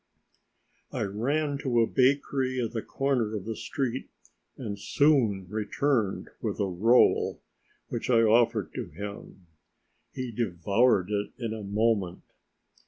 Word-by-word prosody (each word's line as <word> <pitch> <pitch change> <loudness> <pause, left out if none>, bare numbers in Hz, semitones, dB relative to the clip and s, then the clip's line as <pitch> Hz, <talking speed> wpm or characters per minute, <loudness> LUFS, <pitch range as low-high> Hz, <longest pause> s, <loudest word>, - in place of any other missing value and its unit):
I - - -2
ran 140 +9 -1
to 125 -4 +1
a - - +4
bakery 130 0 +1
at 115 -3 -1
the 115 -2 -3
corner 125 -6 -1
of 100 - -5
the 115 0 -3
street 130 -1 -3 0.5
and 105 -5 -5
soon 115 -7 +2
returned 110 +2 -1
with - - -3
a 100 - +2
roll, 105 +7 +3 0.5
which 120 - -4
I 115 -2 +5
offered 115 -4 +3
him. 100 -2 -7 0.7
He 130 -2 -5
devoured 100 0 +1
it 105 0 -2
in 115 -3 -3
a 110 - -6
moment. 100 -3 0
115 Hz, 125 wpm, -28 LUFS, 100-130 Hz, 0.7 s, I